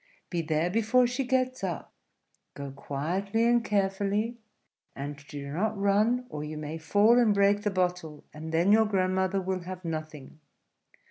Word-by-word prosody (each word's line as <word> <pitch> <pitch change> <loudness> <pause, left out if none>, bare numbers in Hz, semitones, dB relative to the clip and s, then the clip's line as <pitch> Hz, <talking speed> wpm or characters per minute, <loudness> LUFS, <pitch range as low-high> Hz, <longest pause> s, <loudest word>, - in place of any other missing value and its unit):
Be 175 -2 0
there 160 +2 0
before 230 +4 +3
she 245 +3 -1
gets 255 -2 0
up; 175 -4 -4 0.6
go 140 -1 -6
quietly 175 +11 -1
and 240 -1 +3
carefully; 205 +3 0 0.6
and 140 +1 -6
do 140 -1 -7
not 210 +6 -1
run, 210 +5 +2
or 150 -7 -6
you 155 0 -6
may 155 +1 -5
fall 205 +9 +4
and 220 -4 +4
break 200 +1 +3
the 210 - 0
bottle, 180 -5 -2
and 160 +1 -7
then 170 +5 +3
your 220 +1 +5
grandmother 190 -1 +1
will 190 0 -2
have 185 0 -8
nothing. 155 -3 -6
190 Hz, 155 wpm, -28 LUFS, 155-215 Hz, 0.6 s, your